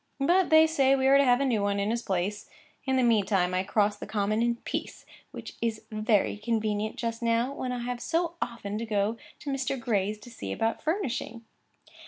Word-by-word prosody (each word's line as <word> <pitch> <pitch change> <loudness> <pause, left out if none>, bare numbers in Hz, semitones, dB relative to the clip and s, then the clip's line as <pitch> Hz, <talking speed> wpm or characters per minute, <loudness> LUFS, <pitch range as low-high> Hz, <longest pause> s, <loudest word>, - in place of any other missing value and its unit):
But 350 +6 +3
they 315 0 +7
say 275 -4 +3
we 265 -1 0
are 275 +1 +6
to - - +5
have 250 0 +4
a - - +2
new 235 -6 +1
one 200 0 0
in 200 +2 0
his 235 0 -1
place. 195 +1 -2 0.4
In 265 -1 +1
the 260 - +3
meantime 200 -6 +2
I 185 - +2
cross 205 +1 +1
the - - -8
common 215 +1 0
in 235 0 +2
peace, - - -6 0.2
which - - -9
is 225 -2 -2
very 215 -1 +1
convenient 215 -1 -1
just 230 0 -3
now, 235 +3 +1
when 255 -2 -4
I 245 -1 -3
have 245 0 -4
so 335 +4 0
often 215 -3 -4
to 230 - -3
go 210 +1 0 0.2
to 285 - -4
Mr. 270 -1 -2
Gray's 210 -3 0
to 245 - -12
see 100 - -6
about 225 - -1
furnishing. 260 - -3
230 Hz, 210 wpm, -28 LUFS, 210-260 Hz, 0.4 s, they